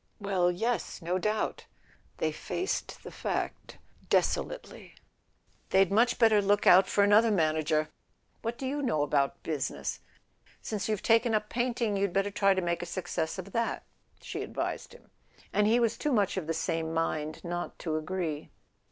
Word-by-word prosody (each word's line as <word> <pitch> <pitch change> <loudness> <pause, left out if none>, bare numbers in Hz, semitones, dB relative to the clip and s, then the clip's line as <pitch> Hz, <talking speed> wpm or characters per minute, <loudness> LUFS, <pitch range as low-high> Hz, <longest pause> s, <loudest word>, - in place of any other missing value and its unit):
"Well, 195 -3 +1
yes, 225 +7 -2
no 180 +2 0
doubt 215 +3 -1 0.3
" - - -33
They - - 0
faced 375 - -4
the - - -8
fact - - -4 0.3
deso¬ - - +3
lately. - - -10 0.7
"They'd 190 -1 +4
much 235 +4 +3
better 225 -3 +5
look 205 +1 +2
out 185 +2 +7
for 205 - +3
another 210 +3 +5
manager. 155 -4 +1 0.5
What 230 +1 -3
do 270 - -5
you 285 +2 -2
know 225 - +1
about 140 -1 0
business? 150 -5 -3 0.6
Since 210 -2 -4
you've 210 -2 -1
taken 225 0 +4
up 210 0 -1
painting 240 -4 0
you'd 195 -2 0
better 195 +1 +1
try 195 -1 +3
to 190 - 0
make 170 0 -1
a 175 - -5
success 175 -2 -3
of 190 +1 -7
that," 230 +2 -1 0.4
she - - -6
advised - - -4
him; - - -18 0.4
and 210 0 +3
he 230 +3 +4
was 230 -1 +1
too 300 - 0
much 205 -6 +2
of 185 -5 -3
the 165 - 0
same 165 0 -2
mind 155 -1 -2
not 175 0 -4
to 160 -3 -3
agree. 155 -1 -3
195 Hz, 170 wpm, -29 LUFS, 165-220 Hz, 0.7 s, out